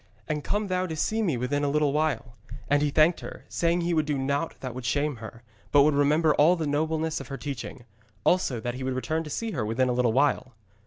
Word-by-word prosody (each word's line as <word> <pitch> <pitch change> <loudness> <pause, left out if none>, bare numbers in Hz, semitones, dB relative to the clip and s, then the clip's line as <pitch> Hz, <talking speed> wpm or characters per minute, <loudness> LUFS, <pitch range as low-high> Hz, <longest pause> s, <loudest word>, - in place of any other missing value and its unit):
And 150 -1 -2
come 210 +1 -1
thou 185 -1 -1
to 160 - -4
see 220 +8 0
me 165 - 0
within 140 +4 -1
a - - +2
little 150 -1 +1
while.' 140 -6 -1 0.3
And 145 0 +3
he 150 - +2
thanked 155 +4 +4
her, - - -9
saying 170 +1 0
he 170 0 0
would 155 -2 +1
do 145 -2 0
naught 140 +4 -1
that 130 -2 -5
should 130 0 -7
shame 145 +3 0
her, 115 +2 -10 0.3
but 145 -1 +6
would 150 +1 +3
remember 150 +2 +3
all 160 +5 +5
the 165 -3 -3
nobleness 160 +2 -1
of - - -8
her 140 - -6
teaching; 135 -4 -6 0.4
also, 175 -9 +2
that 120 +2 -3
he 130 +1 -6
would 130 0 -2
return 155 +5 -1
to - - -7
see 225 +9 -3
her 130 - -2
within 115 +4 +1
a - - +1
little 120 -1 +2
while. 130 -1 +1
145 Hz, 245 wpm, -27 LUFS, 130-160 Hz, 0.4 s, but